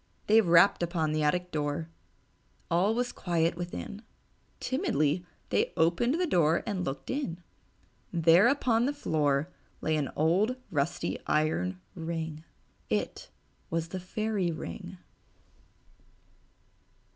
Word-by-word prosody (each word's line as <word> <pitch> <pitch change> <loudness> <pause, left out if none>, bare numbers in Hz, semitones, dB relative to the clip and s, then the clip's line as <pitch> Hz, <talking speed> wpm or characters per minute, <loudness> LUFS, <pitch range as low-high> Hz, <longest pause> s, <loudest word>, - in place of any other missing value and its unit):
They 220 +2 +6
rapped 175 +1 +5
upon 165 -3 0
the 155 0 0
attic 180 +4 +1
door. 150 +1 -2 0.8
All 190 +6 +3
was 245 0 0
quiet 170 -2 0
within. 175 +4 -6 0.6
Timidly 155 - 0 0.3
they - - +1
opened 170 - +3
the 365 - +2
door 170 - +3
and 200 -5 -2
looked 135 -3 -4
in. 185 - -3 0.7
There 170 +4 +5
upon 245 -3 +2
the 285 - 0
floor 150 - 0 0.3
lay 155 - 0
an 145 -3 -1
old 185 +11 +2 0.2
rusty 145 +1 -1
iron 95 - +1
ring. 160 -2 -4 0.5
It - - -2 0.4
was 165 0 -2
the 185 - -4
Fairy 200 0 -1
Ring. 85 - -7
170 Hz, 115 wpm, -29 LUFS, 155-200 Hz, 0.8 s, They